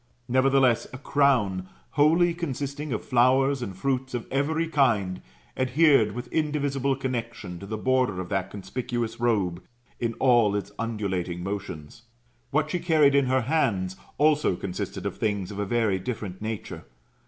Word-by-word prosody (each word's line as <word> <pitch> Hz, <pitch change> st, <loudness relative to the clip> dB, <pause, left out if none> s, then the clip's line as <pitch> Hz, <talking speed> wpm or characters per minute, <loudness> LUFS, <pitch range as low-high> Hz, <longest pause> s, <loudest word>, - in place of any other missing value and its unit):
Nevertheless, 130 Hz, -1 st, +3 dB
a -, -, -5 dB
crown, 120 Hz, -10 st, +1 dB, 0.2 s
wholly 165 Hz, +4 st, +4 dB
consisting 145 Hz, -3 st, -4 dB
of 110 Hz, -, -3 dB
flowers 130 Hz, +2 st, +3 dB
and 95 Hz, -6 st, -5 dB
fruits 130 Hz, +2 st, -1 dB
of 120 Hz, -, -3 dB
every 155 Hz, +5 st, 0 dB
kind, 110 Hz, -, +1 dB, 0.3 s
adhered 130 Hz, -4 st, +4 dB
with 120 Hz, +2 st, -6 dB
indivisible 145 Hz, -3 st, 0 dB
connexion 115 Hz, -8 st, -4 dB
to 100 Hz, -, -9 dB
the 110 Hz, +1 st, -3 dB
border 125 Hz, -4 st, +1 dB
of 95 Hz, -, -4 dB
that 95 Hz, -2 st, -1 dB
conspicuous 115 Hz, +4 st, -4 dB
robe, 100 Hz, -7 st, +1 dB, 0.4 s
in 115 Hz, -1 st, -1 dB
all 120 Hz, -6 st, +4 dB
its 100 Hz, 0 st, -3 dB
undulating 95 Hz, -6 st, -2 dB
motions. 95 Hz, -1 st, -6 dB, 0.5 s
What 155 Hz, +1 st, 0 dB
she 180 Hz, -, 0 dB
carried 155 Hz, -5 st, +4 dB
in 140 Hz, -2 st, +3 dB
her 130 Hz, 0 st, +2 dB
hands 115 Hz, -, 0 dB, 0.2 s
also 150 Hz, -7 st, +3 dB
consisted 90 Hz, 0 st, -5 dB
of -, -, -3 dB
things 100 Hz, -3 st, -1 dB
of 100 Hz, -, -6 dB
a 100 Hz, -, 0 dB
very 110 Hz, -4 st, +1 dB
diflerent 105 Hz, -4 st, -5 dB
nature. 110 Hz, -1 st, -5 dB
120 Hz, 150 wpm, -26 LUFS, 100-140 Hz, 0.5 s, wholly